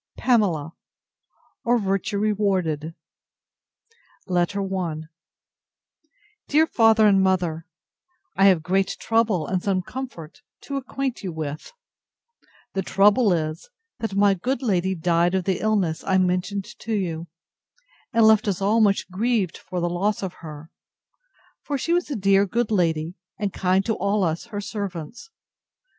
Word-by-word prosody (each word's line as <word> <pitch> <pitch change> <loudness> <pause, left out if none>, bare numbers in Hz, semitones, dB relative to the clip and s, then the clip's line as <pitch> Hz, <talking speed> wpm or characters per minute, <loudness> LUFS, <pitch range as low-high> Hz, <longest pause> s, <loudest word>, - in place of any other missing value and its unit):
PAMELA, 180 - +1 0.9
or 240 +1 +3
VIRTUE 195 0 -1
REWARDED 190 -7 0 1.3
LETTER 185 +2 0
I 185 -5 -3 1.5
DEAR 310 +2 +4
FATHER 225 -6 +4
AND 195 -2 +5
MOTHER, 175 -4 0 0.7
I 195 - +4
have 185 -5 +5
great 190 +3 0
trouble, 225 -8 +1
and 185 +2 -1
some 185 -2 0
comfort, 185 -10 -8 0.2
to 280 - -4
acquaint 265 -1 -3
you 185 - -3
with. 155 - -6 1.0
The 195 - -1
trouble 205 +4 +4
is, 155 - -2 0.3
that 225 -4 -3
my 200 0 +4
good 255 +9 -2
lady 190 -4 +1
died 175 +1 +2
of 190 - 0
the 185 -1 -1
illness 200 -7 0
I 190 -1 +2
mentioned 185 +2 0
to 225 - -4
you, 170 -4 -3 0.8
and 225 -1 +4
left 220 -1 +5
us 195 -3 0
all 210 +4 +2
much 200 -2 +2
grieved 205 -2 0
for 180 - -5
the 175 - 0
loss 195 +5 -1
of 185 -2 -4
her; 155 0 -10 0.9
for 285 - -3
she 335 +6 -1
was 350 -2 0
a 285 - -2
dear 195 0 +3
good 230 +3 -1
lady, 165 -4 +1 0.2
and 205 -3 -2
kind 190 +1 +1
to 225 - +1
all 200 0 0
us 165 +2 -1
her 210 -3 -5
servants. 200 - -6
195 Hz, 140 wpm, -23 LUFS, 175-215 Hz, 1.5 s, AND